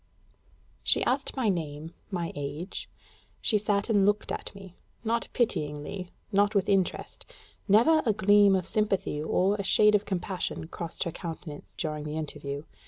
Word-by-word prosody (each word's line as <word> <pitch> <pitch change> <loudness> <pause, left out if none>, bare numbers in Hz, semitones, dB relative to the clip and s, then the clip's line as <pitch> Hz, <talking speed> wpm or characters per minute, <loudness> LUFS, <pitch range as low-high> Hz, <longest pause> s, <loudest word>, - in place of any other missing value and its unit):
She - - +3
asked 270 +2 0
my 255 -4 +1
name, 160 -4 -2 0.2
my 175 -4 -3
age; 145 +6 -5 0.5
she 215 - +2
sat 205 -1 0
and 205 -4 +3
looked 205 +1 +1
at - - -4
me 195 -2 -11 0.3
not 230 +1 0
pityingly, 175 -4 -2 0.2
not 205 +1 +3
with 195 -2 +2
interest: 195 -3 0 0.4
never 240 +11 +5
a 225 - +3
gleam 205 -1 +5
of 185 -2 0
sympathy 195 -6 0
or 190 +6 +2
a 200 - -2
shade 210 +2 +5
of 210 0 +3
compassion 185 -3 -3
crossed 170 -2 -4
her 170 - -3
countenance 160 -3 -8
during 155 -3 -3
the 150 +1 -4
interview. 145 -2 -5
190 Hz, 155 wpm, -28 LUFS, 160-205 Hz, 0.5 s, never